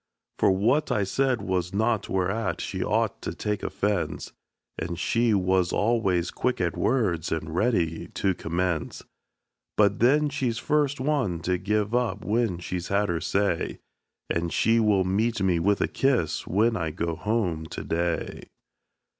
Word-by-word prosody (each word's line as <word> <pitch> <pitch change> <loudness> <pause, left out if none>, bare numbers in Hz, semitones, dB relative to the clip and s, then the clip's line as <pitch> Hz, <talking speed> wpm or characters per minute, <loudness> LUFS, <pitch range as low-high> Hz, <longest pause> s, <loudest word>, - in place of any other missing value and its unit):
For - - +4
what 115 +11 +2
I 105 - +2
said 125 +2 0
was 95 -1 -1
naught 110 0 +1
whereat 95 0 -1
she - - -3
ought - - 0
to - - -5
take 105 -1 -2
offense; 100 -3 -2 0.5
And 85 +1 -4
she 115 +4 +2
was 95 -2 +2
always 100 -6 +1
quick 125 - -1
at 85 -3 0
words 95 - 0
and 80 0 -3
ready 85 -5 0
to 95 -1 +1
commence. 85 -1 -2 0.7
But 100 -1 +3
then 145 +5 +4
she's 130 -5 -1
first 145 +1 +1
one 130 - 0
to 90 +1 0
give 105 +3 0
up 115 -5 0
when 110 -4 +1
she 90 +1 -4
has 90 - -5
had 100 +1 +1
her 85 -2 -1
say; 100 -4 0 0.5
And 85 0 -1
she 115 +1 +3
will 105 -4 +3
meet 110 +5 0
me 95 -3 +2
with 100 +4 +2
a - - +2
kiss, 125 - 0
when 110 +5 +2
I 80 -5 -1
go 85 +1 -3
home 90 -4 -1
to - - -6
day. 85 0 -2
100 Hz, 160 wpm, -26 LUFS, 85-115 Hz, 0.7 s, For